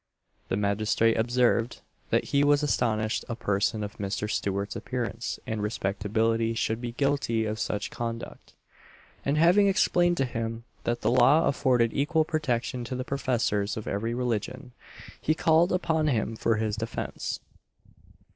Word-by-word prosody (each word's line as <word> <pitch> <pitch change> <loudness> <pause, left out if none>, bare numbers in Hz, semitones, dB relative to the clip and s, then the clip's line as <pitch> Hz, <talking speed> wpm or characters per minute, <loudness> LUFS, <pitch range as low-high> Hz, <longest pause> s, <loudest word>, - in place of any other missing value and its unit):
The 95 - 0
magistrate 105 +2 +2
observed, 120 0 +1 0.3
that - - +2
he 140 0 +4
was 145 0 +4
astonished 110 -6 0
a 115 - -2
person 105 0 0
of 105 - -7
Mr. 100 +1 -2
Stewart's 100 -1 -2
appearance 120 -2 -3
and 110 -1 -3
respectability 110 +2 0
should 110 0 -1
be 120 -1 -4
guilty 140 -4 0
of 110 0 -3
such 105 - -2
conduct; 115 0 -6 0.7
and 140 +2 0
having 180 +6 +5
explained 175 -2 +3
to 135 - +2
him 115 -1 -4 0.2
that 120 0 -1
the - - +2
law 130 +6 +5
afforded 125 -4 +2
equal 155 +3 +1
protection 125 -6 -1
to 130 - -4
the 130 - -3
professors 115 -7 0
of 110 - -5
every 115 +4 -2
religion, 125 +1 -3 0.5
he 155 - +1
called 160 +2 +3
upon 160 -4 +1
him 115 -5 0
for 115 0 +1
his 110 -1 -1
defence. 115 +1 -4
115 Hz, 145 wpm, -27 LUFS, 110-140 Hz, 0.7 s, having